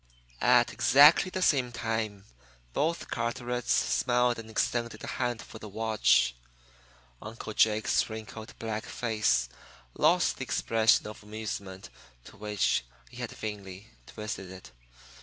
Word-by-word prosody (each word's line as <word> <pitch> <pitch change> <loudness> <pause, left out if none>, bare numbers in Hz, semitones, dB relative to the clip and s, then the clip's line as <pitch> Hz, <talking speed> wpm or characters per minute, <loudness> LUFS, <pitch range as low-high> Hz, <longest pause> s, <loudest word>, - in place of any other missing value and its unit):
At - - +4
exactly 145 +7 +6
the 185 0 -2
same 130 -7 +2
time 110 -4 -3 0.5
both 165 +3 -1
Carterets 120 +1 -2
smiled 125 -1 +2
and 110 -1 -9
extended 115 0 -2
a - - -4
hand 120 -2 -2
for 110 - -11
the 110 - -9
watch. 65 - +2 0.9
Uncle 110 0 -7
Jake's 110 +1 +2
wrinkled, 110 0 -8
black 110 0 -4
face 110 - 0 0.5
lost - - +2
the - - -4
expression 115 0 +2
of 105 0 -8
amusement 105 -3 -7 0.3
to - - -13
which 105 -7 0 0.3
he - - -13
had - - -4
vainly 100 -3 -7 0.2
twisted 105 -3 -6
it. 95 -9 -11
110 Hz, 125 wpm, -29 LUFS, 105-120 Hz, 0.9 s, exactly